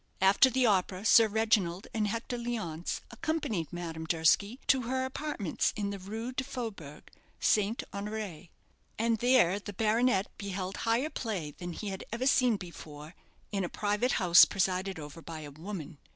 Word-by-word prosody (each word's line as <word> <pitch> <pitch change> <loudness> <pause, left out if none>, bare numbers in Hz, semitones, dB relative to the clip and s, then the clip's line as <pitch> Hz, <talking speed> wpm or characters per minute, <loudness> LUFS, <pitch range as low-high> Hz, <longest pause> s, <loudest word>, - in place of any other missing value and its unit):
After 195 +7 +6
the 260 0 +2
opera 190 -2 +1
Sir 225 0 +7
Reginald 210 -5 +1
and 215 -2 0
Hector 230 +3 -3
Leonce 220 -9 -3
accompanied 295 - -2
Madame 165 -2 -5
Durski 175 - +2
to 265 -2 +4
her 260 0 0
apartments 260 - -2
in 205 -2 -2
the 200 - -5
Rue 220 +6 -5
du 260 0 -2
Faubourg, 215 - -7 0.4
St. 215 +2 +2
Honoré; 200 -4 -5 0.5
and 230 0 +1
there 235 -6 +4
the 205 0 -8
baronet 220 0 +2
beheld 195 -1 -4
higher 235 +7 0
play 190 -11 -3
than 175 +3 -7
he 210 +4 -5
had 190 -1 -5
ever 235 +3 -2
seen 250 -4 +4
before 155 -4 -10 0.4
in 195 -2 -1
a 175 - -2
private 210 +5 0
house 175 -4 +7
presided 190 0 0
over 150 +1 -9
by 160 -1 -7
a 145 -1 -8
woman. 160 -1 -7
200 Hz, 160 wpm, -30 LUFS, 175-230 Hz, 0.5 s, Sir